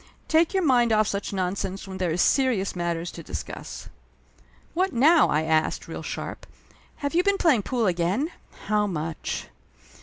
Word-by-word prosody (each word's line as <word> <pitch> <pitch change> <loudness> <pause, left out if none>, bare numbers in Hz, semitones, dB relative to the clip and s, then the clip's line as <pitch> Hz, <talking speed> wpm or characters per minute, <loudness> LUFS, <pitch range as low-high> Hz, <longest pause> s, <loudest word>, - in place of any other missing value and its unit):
"Take 320 +4 +3
your 380 - +2
mind 245 -4 +4
off 215 -1 +3
such 200 -1 -3
nonsense 190 0 -3
when 190 0 -7
there 180 -2 0
is 170 +2 +2
serious 245 -9 +2
matters 170 -1 -2
to 170 - -9
discuss." 95 - -7 0.9
"What 370 +1 0
now?" 310 +7 +5
I 155 +1 +2
asked, 160 0 0
real - - -6
sharp. - - -6 0.6
"Have 285 - -1
you 345 - +4
been 400 0 +2
playing 305 - +3
pool 235 +2 -1
again? 185 - 0 0.3
How 210 -1 +2
much?" 165 -3 -4
200 Hz, 160 wpm, -25 LUFS, 175-280 Hz, 0.9 s, now